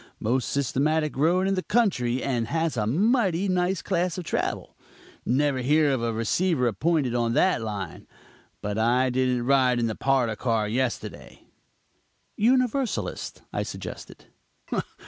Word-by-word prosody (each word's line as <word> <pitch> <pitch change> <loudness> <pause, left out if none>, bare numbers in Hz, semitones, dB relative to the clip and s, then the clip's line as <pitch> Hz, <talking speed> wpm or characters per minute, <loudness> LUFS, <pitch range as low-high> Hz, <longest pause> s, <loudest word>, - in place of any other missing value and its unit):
Most 125 +4 0
systematic 150 +3 0
road 175 +7 +2
in 195 - +1
the 185 - 0
country 130 - +1
and 120 -4 -1
has 165 0 -1
a 105 -3 -1
mighty 195 - +2
nice 185 -1 0
class 180 -1 -1
of 180 - -4
travel. - - -3 0.5
Never 140 +1 +2
hear 145 +3 +3
of 130 -3 0
a 115 0 0
receiver 125 +6 0
appointed 130 - +1
on 120 -1 0
that 185 0 +2
line. 100 -6 -6 0.6
But 105 +1 -2
I 125 +3 +2
didn't 125 -1 0
ride 130 -2 +3
in 120 - +1
the 110 - -1
parlor 125 -3 +1
car 110 -2 0
yesterday." 125 +2 -3 0.9
"Universalist?" 255 +2 0
I - - -1
suggested. - - -8
135 Hz, 140 wpm, -25 LUFS, 120-175 Hz, 0.9 s, hear